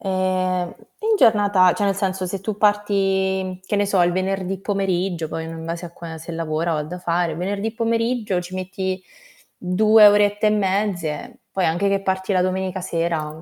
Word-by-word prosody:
Ehm, 185 Hz, -2 st, -1 dB, 0.2 s
in 440 Hz, 0 st, +2 dB
giornata 205 Hz, -, +5 dB
cioè 205 Hz, -, -1 dB
nel 195 Hz, -1 st, +1 dB
senso, 190 Hz, -2 st, -1 dB
se 190 Hz, +1 st, -4 dB
tu 210 Hz, 0 st, -4 dB
parti 195 Hz, -3 st, +1 dB
che 205 Hz, -, -1 dB
ne 205 Hz, -, +2 dB
so, 195 Hz, -2 st, +2 dB
il 175 Hz, -, +2 dB
venerdì 190 Hz, 0 st, -2 dB
pomeriggio 190 Hz, -4 st, -1 dB
poi, 160 Hz, 0 st, -4 dB
mhmm, 165 Hz, -, -7 dB
in 160 Hz, -, -8 dB
base 170 Hz, +1 st, -4 dB
a 170 Hz, -, -9 dB
qua 165 Hz, -1 st, -8 dB
se 165 Hz, +2 st, -8 dB
lavora 165 Hz, +1 st, -1 dB
o 155 Hz, -, 0 dB
ha 150 Hz, -, -2 dB
da 175 Hz, +4 st, -7 dB
fare, 170 Hz, -2 st, 0 dB
venerdì 200 Hz, +5 st, -2 dB
pomeriggio 230 Hz, -4 st, 0 dB
ci 180 Hz, +1 st, -10 dB
metti 185 Hz, 0 st, -3 dB, 0.6 s
2 215 Hz, +4 st, +5 dB
orette 205 Hz, +1 st, +3 dB
e -, -, +5 dB
mezze, 200 Hz, 0 st, -1 dB
poi 190 Hz, -2 st, 0 dB
anche 175 Hz, +5 st, +1 dB
che 195 Hz, 0 st, +1 dB
parti 190 Hz, 0 st, -1 dB
la 185 Hz, -, +3 dB
domenica 185 Hz, 0 st, -2 dB
sera, 165 Hz, -3 st, -2 dB
190 Hz, 190 wpm, -22 LUFS, 175-200 Hz, 0.6 s, giornata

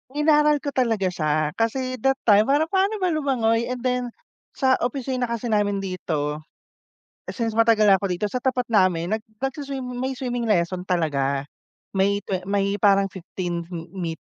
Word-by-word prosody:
Inaral 300 Hz, -1 st, +3 dB
ko 285 Hz, -, -2 dB
talaga 225 Hz, -8 st, +1 dB
siya. 155 Hz, -2 st, 0 dB
Kasi 255 Hz, +3 st, -1 dB
that 270 Hz, +4 st, +2 dB
time 210 Hz, -1 st, +5 dB
parang 295 Hz, +4 st, +2 dB
paano 390 Hz, +2 st, +2 dB
ba 370 Hz, -4 st, 0 dB
lumangoy 235 Hz, -7 st, +1 dB
and 250 Hz, -1 st, -4 dB
then 250 Hz, -1 st, 0 dB, 0.5 s
sa 260 Hz, -1 st, +2 dB
opisina 255 Hz, 0 st, -2 dB
kasi 235 Hz, 0 st, -3 dB
namin 205 Hz, -2 st, +1 dB
dito, 155 Hz, -6 st, -3 dB, 0.9 s
since 225 Hz, -2 st, -2 dB
matagal 225 Hz, -2 st, +5 dB
na 195 Hz, -, +7 dB
ako 200 Hz, -, -4 dB
dito, 180 Hz, +1 st, -1 dB
sa 250 Hz, -, -2 dB
tapat 250 Hz, -1 st, -1 dB
namin 185 Hz, -5 st, +2 dB
nag 220 Hz, -, -18 dB, 0.2 s
nagsu-swim 270 Hz, 0 st, -3 dB, 0.2 s
may 260 Hz, +2 st, -2 dB
swimming 245 Hz, -2 st, -3 dB
lesson 180 Hz, -3 st, 0 dB
talaga. 140 Hz, -6 st, 0 dB, 0.6 s
May 200 Hz, +1 st, +2 dB
twe 185 Hz, -2 st, -4 dB
may 200 Hz, 0 st, 0 dB
parang 200 Hz, -1 st, +3 dB
15 175 Hz, -2 st, -5 dB
me 170 Hz, 0 st, -5 dB
220 Hz, 160 wpm, -23 LUFS, 185-255 Hz, 0.9 s, na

